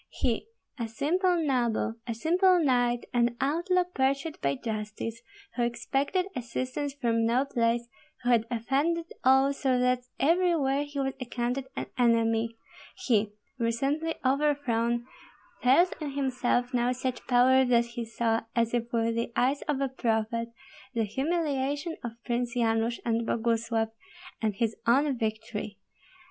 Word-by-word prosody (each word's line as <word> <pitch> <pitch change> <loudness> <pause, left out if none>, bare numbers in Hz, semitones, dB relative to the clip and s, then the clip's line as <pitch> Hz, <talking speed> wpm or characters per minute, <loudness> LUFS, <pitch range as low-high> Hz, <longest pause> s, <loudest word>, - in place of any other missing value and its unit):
He, 240 - -1 0.3
a 230 - -1
simple 350 - +1
noble, 245 -8 +1
a 230 - -2
simple 360 - +4
knight, 245 -5 +2
an 240 -1 +2
outlaw 345 +6 +2
pursued 275 -2 -1
by 140 0 +1
justice, 215 - -5 0.3
who 245 - -1
expected 270 +9 0
assistance 255 +4 -3
from 230 -4 +1
no 240 +4 +2
place, 235 -3 0 0.4
who 245 - +2
had 230 -1 +3
offended 280 +8 0 0.2
all 265 +2 +5
so 265 -2 +1
that 250 0 +2 0.2
everywhere 300 -3 +2
he 290 -1 -6
was 270 -1 0
accounted 250 +2 -2
an - - -3
enemy, 230 -1 +2 0.5
he, 215 -4 +3 0.3
recently 275 +8 0
overthrown, 255 -4 +1 0.6
felt 275 +9 +4
in 290 -2 -4
himself 250 -2 0
now 245 0 +2
such 255 -1 -3
power 260 +1 +5
that 240 -2 +3
he 235 0 -5
saw, 225 0 0
as 230 -1 +1
if 235 -1 -1
with 230 -1 +1
the 230 +1 -2
eyes 270 +3 +2
of 285 -2 0
a 275 - +2
prophet, 230 -2 -1 0.5
the 230 - +2
humiliation 285 - -1
of 235 -2 -4
Prince 240 0 -1
Yanush 230 0 +1
and 230 0 0
Boguslav, 230 -1 0 0.5
and 215 -3 0
his 225 +1 0
own 275 +4 +4
victory. 220 -2 -4
245 Hz, 140 wpm, -28 LUFS, 230-275 Hz, 0.6 s, all